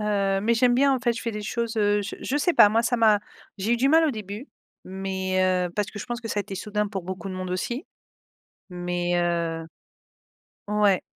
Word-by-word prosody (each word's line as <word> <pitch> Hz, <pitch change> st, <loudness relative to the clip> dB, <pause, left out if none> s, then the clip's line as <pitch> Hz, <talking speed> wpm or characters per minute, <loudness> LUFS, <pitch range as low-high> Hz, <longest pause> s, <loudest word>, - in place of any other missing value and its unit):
heu, 200 Hz, -2 st, +1 dB
mais 230 Hz, +3 st, +2 dB
j'aime 245 Hz, +1 st, +4 dB
bien 275 Hz, +1 st, +4 dB
en 260 Hz, -, -2 dB
fait, 240 Hz, -1 st, +2 dB
je 230 Hz, -, -6 dB
fais 230 Hz, -, -3 dB
des 210 Hz, 0 st, -5 dB
choses, 230 Hz, +1 st, -3 dB
heu, 205 Hz, -1 st, +3 dB
je 200 Hz, 0 st, -5 dB
je 280 Hz, -, -1 dB
sais 345 Hz, +4 st, +2 dB
pas 205 Hz, -, +8 dB
moi 225 Hz, +2 st, +2 dB
ça 240 Hz, +1 st, +1 dB
m'a 215 Hz, -2 st, +5 dB, 0.4 s
j'ai 210 Hz, +5 st, 0 dB
eu -, -, +3 dB
du 260 Hz, +3 st, +2 dB
mal 320 Hz, +2 st, +5 dB
au 290 Hz, -, 0 dB
début, 210 Hz, +4 st, -7 dB, 0.4 s
mais 190 Hz, 0 st, -2 dB
heu, 185 Hz, -1 st, +2 dB
parce 210 Hz, 0 st, -1 dB
que 205 Hz, -, -8 dB
je 205 Hz, -, -6 dB
pense 240 Hz, -1 st, -4 dB
que 225 Hz, -, -6 dB
ça 210 Hz, -, -2 dB
a -, -, +1 dB
été 195 Hz, -, -8 dB
soudain 210 Hz, +2 st, -2 dB
pour 195 Hz, -3 st, -5 dB
beaucoup 190 Hz, +2 st, -6 dB
de 185 Hz, -, -5 dB
monde 185 Hz, 0 st, -5 dB
aussi, 240 Hz, -, -3 dB, 0.9 s
mais 175 Hz, 0 st, -2 dB
heu 170 Hz, -1 st, -1 dB, 1.0 s
ouais, 210 Hz, -2 st, +3 dB
210 Hz, 230 wpm, -25 LUFS, 190-235 Hz, 1.0 s, pas